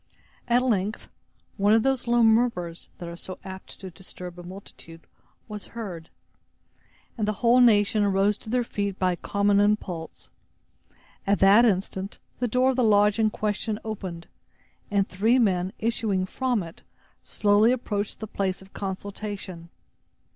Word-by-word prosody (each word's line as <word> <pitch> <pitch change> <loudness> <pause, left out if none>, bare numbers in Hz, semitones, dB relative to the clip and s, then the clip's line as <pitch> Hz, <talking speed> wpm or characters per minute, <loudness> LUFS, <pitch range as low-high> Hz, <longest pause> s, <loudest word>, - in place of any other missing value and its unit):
At 245 +1 +3
length 215 -4 -1 0.5
one 205 +1 +4
of 225 - +3
those 270 -2 0
low 240 0 +4
murmurs, 220 -7 +1
that 175 - -7
are 170 - -7
so 185 +2 -8
apt 190 -1 -9
to 190 -1 -7
disturb 180 0 -10
a - - -7
multitude, 175 -2 -11 0.4
was 210 -2 -8
heard, 175 -8 -6 1.1
and 210 - 0
the 215 - +1
whole 245 +2 +6
nation 215 -2 +4
arose 200 +1 +2
to - - -11
their 250 +1 +1
feet 200 -4 -3
by 185 -1 +2
a - - -1
common 200 +2 +1
impulse. 200 -5 -1 1.0
At 200 0 +3
that 200 +5 +6
instant 190 -1 -1 0.2
the 245 - +1
door 255 +3 +3
of 260 - -4
the 255 - +3
lodge 210 0 +4
in 220 -1 +4
question 210 0 -2
opened, 185 -6 -5 0.6
and 200 -2 +1
three 220 +7 +2
men, 185 -6 +2
issuing 220 -4 0
from 245 0 -1
it, 165 0 -11 0.4
slowly 210 +3 +3
approached 210 -5 -2
the - - -3
place 190 -3 -2
of 190 0 -17
consultation. 195 -3 -6
205 Hz, 155 wpm, -26 LUFS, 190-225 Hz, 1.1 s, whole